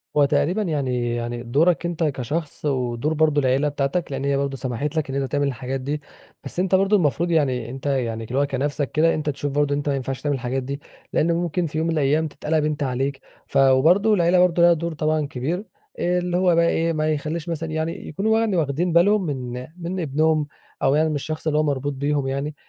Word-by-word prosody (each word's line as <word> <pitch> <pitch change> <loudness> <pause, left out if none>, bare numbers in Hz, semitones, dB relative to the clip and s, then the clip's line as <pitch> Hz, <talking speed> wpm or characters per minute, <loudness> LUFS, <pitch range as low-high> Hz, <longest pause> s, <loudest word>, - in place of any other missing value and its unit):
هو 145 -1 +5
تقريبًا 180 +8 +1
يعني 130 - -1
يعني 120 0 -4
دورَك 160 +9 +2
أنت 170 -1 -2
كشخص، 150 +2 -3
ودور 130 +1 0
برضو 155 -1 +3
العيلة 135 +2 +2
بتاعتك، 145 +4 -2
لأن 135 0 -3
هي 140 0 +1
برضو 140 -1 -2
سمحت 135 +4 -3
لَك 155 -3 -1
إن 135 - -3
أنت 135 - -4
تعمل 145 -1 +1
الحاجات 130 0 -3
دي، 145 +3 -3 0.4
بس - - -5
أنت 190 +1 +2
برضو 195 +2 +3
المفروض 170 -1 +1
يعني 130 -7 +1
أنت 130 +3 -8
يعني، 120 -5 -1
اللي 125 +5 -2
هو 145 - +3
كنفْسك 140 +1 -2
كده، 165 +2 +3
أنت 155 -1 -2
تشوف 145 0 -3
برضو 145 0 +1
إن - - 0
أنت 145 0 -2
ما 140 - +1
ينفعش 135 0 -4
تعمل 145 -1 0
الحاجات 130 +1 -2
دي، 140 +2 -5 0.3
لأن 170 - +2
ممكن 175 +1 -1
في 155 -1 -4
يوم 160 +1 0
من 165 - 0
الأيام 155 +1 +2
تتقلّب 155 +1 -1
أنت 150 -1 -1
عليك 135 +1 -1 0.3
ف - - -2
وبرضو 160 +11 +5
العيلة 180 -2 +3
برضو 180 -1 +3
لها 170 0 +7
دور 170 0 -3
طبعًا 155 0 0
كبير، 155 - -3 0.3
آآ، 180 +1 +1
اللي 175 0 -1
هو 180 -2 +3
بقي 170 0 +4
إيه، 165 0 +1
ما 155 0 0
يخلّيش 155 +3 -4
مثلًا 165 -1 -3
يعني، 160 +1 -3
يكونوا 220 +7 +1
يعني 225 -4 +1
واخدين 160 +3 0
بالهم 195 +4 +4
من 125 -4 -4
من 180 +2 -4
ابنهم، 155 0 +1 0.4
أو 135 +1 +4
يعني 155 +1 +3
من 155 - -1
الشخص 155 +3 -4
اللي 150 -1 +2
هو - - +3
مربوط 145 -1 -1
بيهم 140 0 -1
يعني، 140 +3 -3
150 Hz, 220 wpm, -23 LUFS, 135-165 Hz, 0.4 s, لها